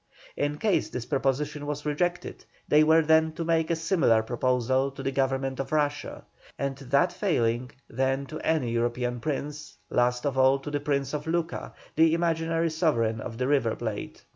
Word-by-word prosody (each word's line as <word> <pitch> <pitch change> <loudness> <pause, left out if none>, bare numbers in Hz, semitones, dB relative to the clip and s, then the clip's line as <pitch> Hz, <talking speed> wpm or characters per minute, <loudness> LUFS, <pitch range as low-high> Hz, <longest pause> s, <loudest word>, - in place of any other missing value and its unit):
In 145 +1 -1
case 210 +3 +1
this 125 -2 -5
proposition 145 +2 -1
was 145 0 -4
rejected, 175 +4 -2 0.2
they 150 +1 +5
were 160 +1 +5
then 160 0 +3
to 165 0 -4
make 165 -1 +1
a 170 - +2
similar 160 - +2
proposal 130 +3 +1
to 135 0 -9
the 135 - -1
Government 135 0 -1
of 135 - -4
Russia; 145 -1 -1 0.3
and 140 -1 -2
that 140 +6 +1
failing, 125 - 0 0.2
then 135 +3 -1
to 155 +3 -7
any 155 -7 0
European 120 +1 -1
prince; 150 +3 -4
last 125 +1 +1
of 135 -2 0
all, 130 +1 +5
to 135 +2 -7
the 145 - 0
Prince 140 -1 -1
of 150 +1 -4
Luca, 165 0 -2 0.2
the 160 +1 +5
imaginary 165 -1 0
sovereign 115 -9 +1
of 115 0 -6
the 125 +1 -1
River 135 -6 +2
Plate. 110 -3 -5
140 Hz, 175 wpm, -27 LUFS, 130-160 Hz, 0.3 s, they